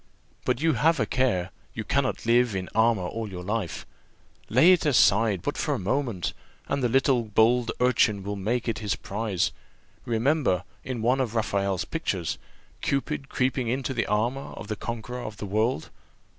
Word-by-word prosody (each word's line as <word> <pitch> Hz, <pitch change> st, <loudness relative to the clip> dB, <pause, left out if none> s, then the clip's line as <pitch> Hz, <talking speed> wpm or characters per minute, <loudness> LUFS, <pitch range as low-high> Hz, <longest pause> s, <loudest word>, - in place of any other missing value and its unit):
But 125 Hz, +1 st, 0 dB
have 160 Hz, 0 st, +3 dB
a 110 Hz, -, +2 dB
care 105 Hz, -8 st, 0 dB, 0.2 s
you 110 Hz, -, -3 dB
cannot 130 Hz, +1 st, 0 dB
live 120 Hz, -2 st, +3 dB
in 95 Hz, -1 st, -3 dB
armour 110 Hz, -3 st, +3 dB
all 110 Hz, +4 st, -4 dB
your 90 Hz, -2 st, -7 dB
life 105 Hz, -2 st, -3 dB, 0.6 s
lay 135 Hz, -, +6 dB
it 180 Hz, -, +4 dB
aside 110 Hz, -, +4 dB
but 145 Hz, -, -2 dB
for 150 Hz, -, 0 dB
a -, -, -2 dB
moment, 115 Hz, -2 st, -1 dB, 0.3 s
and 140 Hz, -, -1 dB
the 125 Hz, -, +2 dB
little 130 Hz, -1 st, +3 dB
bold 115 Hz, +3 st, +3 dB
urchin 110 Hz, -5 st, +3 dB
will 100 Hz, +1 st, -3 dB
make 115 Hz, +6 st, -1 dB
it 110 Hz, -4 st, -1 dB
his 105 Hz, -3 st, -1 dB
prize. 100 Hz, -3 st, -1 dB, 0.5 s
Remember, 120 Hz, -, +1 dB, 0.2 s
in 125 Hz, -4 st, -4 dB
one 125 Hz, +3 st, +3 dB
of 120 Hz, -3 st, -2 dB
Raphael's 100 Hz, -4 st, 0 dB
pictures, 95 Hz, -, -2 dB, 0.4 s
Cupid 140 Hz, 0 st, -2 dB
creeping 130 Hz, -1 st, 0 dB
into 130 Hz, +2 st, -1 dB
the 115 Hz, -, -1 dB
armour 120 Hz, +6 st, -1 dB
of 105 Hz, -, -9 dB
the 110 Hz, -, -1 dB
conqueror 120 Hz, +3 st, -5 dB
of 110 Hz, -3 st, -7 dB
the 105 Hz, -, -5 dB
world." 110 Hz, -1 st, 0 dB
115 Hz, 170 wpm, -26 LUFS, 105-130 Hz, 0.6 s, lay